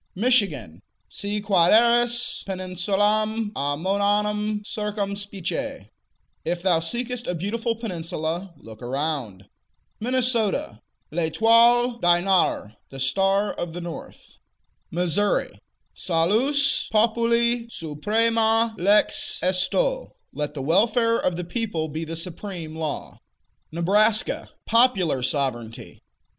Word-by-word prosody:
Michigan 180 - +1 0.3
Si 205 +1 -3
quaeris 235 +5 +3
peninsulam 205 +4 0
amoeanam 205 +7 0
circumspice: 200 -3 -4 0.6
If 175 +1 -3
thou 180 -4 +3
seekest 240 +8 -3
a 180 - -1
beautiful 225 +7 -2
peninsula, 170 -4 -4
look 110 0 -13
around. 125 -7 -3 0.5
Minnesota 230 - 0 0.3
L'Etoile 230 +8 +3
du 175 -2 +4
Nord: 180 - +1
The 135 - -9
Star 195 +8 +1
of 175 -2 -5
the 175 - -6
North. 170 -1 -10 0.5
Missouri 180 +4 0 0.3
Salus 230 - +1
populi 235 +2 +2
suprema 225 +7 +1
lex 210 - +3
esto: - - 0 0.2
Let 150 0 -4
the 135 - -4
welfare 230 - +2
of 180 - 0
the 180 - -3
people 175 -5 -3
be 160 +2 -4
the 165 +1 -6
supreme 170 -1 -6
law. 160 -2 -5 0.5
Nebraska 205 +7 +1 0.2
Popular 195 - +3
Sovereignty. 125 -4 -3
200 Hz, 95 wpm, -24 LUFS, 165-225 Hz, 0.6 s, du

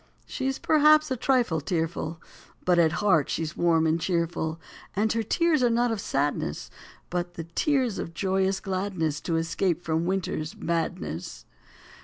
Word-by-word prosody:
She 265 - -3
s 270 - -1
perhaps 305 -1 +4
a - - +2
trifle 240 - +1
tearful, 165 0 -2 0.5
But 180 -1 +4
at 160 -1 +4
heart 160 -8 +4
she 165 - -1
s 155 +1 -5
warm 165 -2 +3
and 160 +1 +1
cheerful, 170 -2 -1 0.4
And 210 +2 +1
her 230 - 0
tears 315 +6 +2
are 245 - +4
not 240 +1 +2
of 220 -3 -2
sadness, 140 - -2 0.4
But 175 0 -3
the 165 - -5
tears 245 - 0
of 165 - -6
joyous 190 +1 +1
gladness 185 -6 -2
To 165 - -1
escape 170 +1 0
from 160 +1 0
winter 190 0 -1
s 155 0 -6
madness. 90 - -3
175 Hz, 165 wpm, -26 LUFS, 160-220 Hz, 0.5 s, perhaps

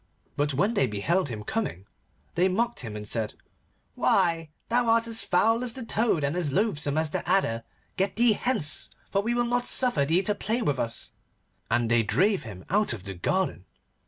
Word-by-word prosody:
But 145 -1 0
when 200 - +2
they 135 - +2
beheld 145 - 0
him 110 -3 -6
coming, 105 - -3 0.5
they 180 +2 +3
mocked 235 +6 -1
him 110 -4 -6
and 105 0 -7
said, 110 0 -2 0.6
'Why, 165 -4 +1 0.2
thou 240 +1 +1
art 230 0 +3
as 225 -1 +2
foul 225 +6 +2
as 240 -2 -1
the 255 -1 -6
toad, 220 -9 +1
and 140 +3 0
as 170 -5 -1
loathsome 150 -5 0
as 160 -1 +1
the - - -1
adder. 115 -12 +1 0.3
Get 195 +1 0
thee 235 -1 +4
hence, 205 - 0 0.2
for 200 - +2
we 235 +3 -1
will 240 0 +1
not 245 +1 0
suffer 245 - +4
thee 165 +7 +2
to 210 - +1
play 220 +4 -1
with 140 -7 0
us,' 115 0 -3 0.6
and 120 -1 +1
they 120 0 +5
drave 190 - +2
him 95 -4 -9
out 205 - +2
of 105 -5 -7
the 95 - -5
garden. 130 - -1
180 Hz, 195 wpm, -27 LUFS, -, 0.6 s, they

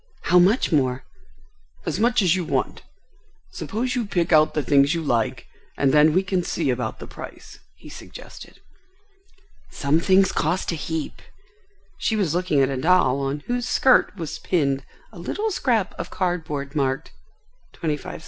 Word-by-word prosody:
"How 180 - +5
much 195 +7 +3
more?" 130 -4 +1 0.8
"As - - -2
much 235 -1 +3
as 180 -1 +3
you 185 - -1
want. 135 -5 -2 0.7
Suppose 245 +4 -3
you 240 -4 -2
pick 175 -3 0
out 155 0 +4
the 150 - 0
things 140 +3 +3
you 165 - -2
like 115 -6 -1 0.3
and 135 -1 +2
then 150 +1 +6
we 185 +3 +3
can 185 -1 0
see 160 -5 -1
about 125 -3 -3
the - - -9
price," - - -11 0.2
he - - -15
suggested. - - -12 1.1
"Some 145 +3 +1
things 190 +2 +4
cost 170 +4 -1
a - - -2
heap." 160 0 -5 0.8
She 220 - 0
was 190 -8 0
looking 175 -5 +1
at 135 - +2
a 135 - -2
doll 140 -3 +3
on 140 +1 -2
whose 245 +6 -3
skirt 260 -5 +3
was 165 -3 -5
pinned 140 -6 0 0.3
a - - -12
little 435 +1 -2
scrap 235 - 0
of - - -5
card 180 -3 -2
board 140 -1 -5
marked, 135 -2 -1 0.6
"25c." 150 -3 -4
160 Hz, 165 wpm, -23 LUFS, 140-185 Hz, 1.1 s, then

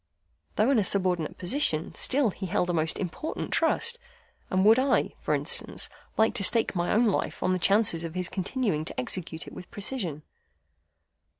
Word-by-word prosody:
Though 220 +6 +3
in 260 - +4
a - - +2
subordinate 185 -5 0
position, 175 - +1
still 265 -5 0
he 190 +1 -6
held 180 -1 0
a - - -3
most 160 -1 0
important 195 - -5
trust, 475 +1 +2 0.5
and 185 +1 +1
would 225 +4 +6
I 270 +1 +1
(for - - 0
instance) - - -2 0.3
like 220 0 +3
to 225 -4 0
stake 230 +3 +5
my 175 0 0
own 235 +3 +3
life 210 - -1
on 185 - +2
the 185 - -1
chances 195 -3 +3
of 165 0 -6
his 180 -1 -2
continuing 195 - -2
to - - -4
execute 160 +5 -3
it - - -11
with 180 - -10
precision? 195 - -4
190 Hz, 180 wpm, -27 LUFS, 175-225 Hz, 0.5 s, would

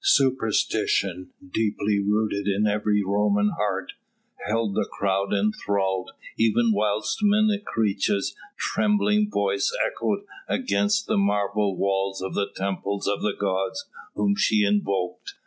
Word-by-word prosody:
Superstition, 110 - +1 0.2
deeply 105 -1 0
rooted 105 0 0
in 100 +1 +1
every 105 0 +1
Roman 105 +1 +2
heart, 95 -2 -2 0.6
held 110 -1 0
the - - -1
crowd 100 0 -1
enthralled 100 -2 0 0.3
even 115 +1 +3
whilst 105 +6 0
Menecreta's 205 - +1 0.2
trembling 105 0 +1
voice 100 -1 0
echoed - - -2 0.2
against 215 -4 +1
the 220 - 0
marble 100 - +1
walls 95 0 0
of 95 0 -4
the 100 - 0
temples 100 +1 -2
of 100 0 0
the 105 -2 -1
gods 95 - -1 0.3
whom 200 0 +1
she 110 - +3
invoked. 100 -3 -1
105 Hz, 115 wpm, -25 LUFS, 100-110 Hz, 0.6 s, even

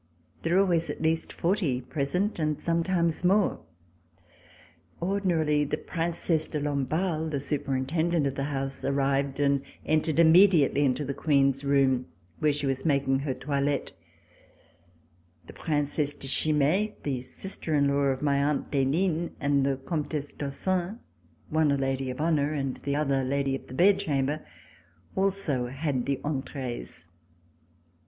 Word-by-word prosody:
There 165 +2 0
were 190 - +6
always 170 -4 +1
at - - -5
least 160 +1 0
forty 170 -8 0
present 145 - -1
and 155 -2 0
sometimes 170 0 0
more. 195 +2 +3 1.4
Ordinarily, 170 -5 +1
the 145 - -2
Princesse 165 -1 -1
de 150 - -3
Lamballe, 155 +4 -1
the 145 -3 -2
superintendent 145 +4 0
of 135 - 0
the 140 0 -2
house, 135 -1 -4
arrived 140 0 0
and 140 -1 +2 0.2
entered 155 0 +1
immediately 165 -3 +6
into 140 +2 +1
the 140 - -3
Queen's 140 -2 +2
room, 135 -2 +2 0.3
where 150 - +3
she 145 0 -3
was 135 -1 -1
making 140 -3 +2
her 135 -2 -2
toilette. 140 +1 -1 1.5
The - - -12
Princesse 145 -1 -1
de - - -4
Chimay, 155 +9 +1
the 135 -4 -2
sister 160 +3 -5
in 140 -1 +3
law 140 0 +2
of 135 0 0
my 140 -1 +2
aunt 145 0 -1
d'Henin, 160 +5 +1
and 140 -1 +2
the 135 -1 +1
Comtesse 145 +1 -3
d'Ossun, 180 +8 -2 0.5
one 155 -1 +3
a 140 - +2
lady 135 -1 -1
of 125 - -5
honor 155 -2 +1
and 135 -3 -2
the 140 0 -3
other 140 -3 +1
lady 135 +1 0
of - - -9
the 130 - -9
bed 190 +6 +5
chamber, 145 0 -1 0.7
also 190 -10 0
had 135 -1 -2
the 140 -1 0
entrees. 130 - -5
145 Hz, 145 wpm, -27 LUFS, 135-165 Hz, 1.5 s, were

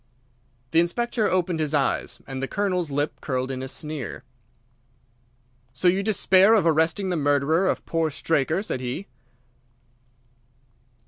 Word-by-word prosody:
The 165 - +4
Inspector 220 +6 0
opened 180 -2 0
his 155 -1 0
eyes, 140 -2 -1
and 135 -1 -6
the 135 - -2
Colonel's 180 -4 -1
lip 145 +2 -2
curled 130 -1 -2
in 130 -1 -4
a 130 - -4
sneer. 150 -3 -5 1.5
"So 155 +8 0
you 185 +2 +3
despair 200 0 +4
of 210 - +2
arresting 165 +4 +2
the 180 - 0
murderer 145 +5 +2
of - - -2
poor 165 -1 0
Straker," 160 +4 0
said 170 - -3
he. 130 +9 -4
160 Hz, 135 wpm, -24 LUFS, 140-185 Hz, 1.5 s, The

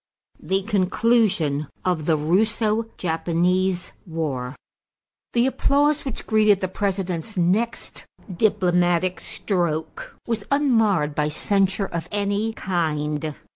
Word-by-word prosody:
=The 190 +5 0
Conclusion 190 - +1 0.2
of 175 -5 0
the 160 -2 +3
Russo 215 +7 +1
Japanese 180 +2 0
War.= 145 -6 -3 0.8
The 235 0 +3
applause 285 +3 +2
which 265 - -5
greeted 215 -2 +4
the 185 - -1
President's 190 0 -3
next 195 +7 -1 0.3
diplomatic 180 -3 +2
stroke 170 -6 -3
was 225 -3 -2
unmarred 225 - +2
by 150 0 0
censure 195 +5 +1
of 170 -2 -5
any 205 +1 0
kind. 155 -5 -2
185 Hz, 100 wpm, -23 LUFS, 165-215 Hz, 0.8 s, greeted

